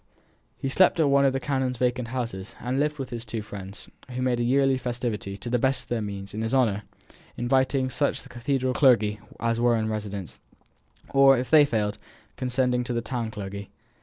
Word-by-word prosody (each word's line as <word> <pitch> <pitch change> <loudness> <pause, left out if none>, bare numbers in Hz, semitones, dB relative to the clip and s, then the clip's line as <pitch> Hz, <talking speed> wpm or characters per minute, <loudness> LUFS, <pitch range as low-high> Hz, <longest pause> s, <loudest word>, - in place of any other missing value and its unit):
He - - -3
slept 175 +6 +4
at 150 -3 +4
one 140 0 +5
of 135 - +3
the 135 - 0
canon's 130 -3 -1
vacant 125 0 0
houses, 115 -6 -4
and 125 +2 -2
lived 150 +1 0
with 135 -2 -5
his 115 -1 -4
two 115 -2 -4
friends, 100 -1 -8 0.2
who 125 0 -3
made 125 -2 +1
a - - +1
yearly 135 +1 +3
festivity, 120 -6 -3
to 100 - -8
the 125 +1 +1
best 130 +3 +1
of - - -24
their 120 -2 -1
means, 100 -1 -6
in 110 - -3
his 115 +3 0
honour, 110 -6 +2 0.6
inviting 130 +1 +1
such 145 - +1
of - - -5
the 135 - -14
cathedral 130 +1 -1
clergy 110 -6 +4 0.2
as 115 0 0
were 120 0 +4
in 110 0 -1
residence: 105 -4 -5 0.7
or, 135 -1 +6
if 125 +1 -3
they 155 -2 +8
failed, 105 -5 -1 0.4
condescending 125 -1 0
to 120 - -3
the 120 - 0
town 115 0 -3
clergy. 100 -1 -7
125 Hz, 205 wpm, -26 LUFS, 110-130 Hz, 0.7 s, they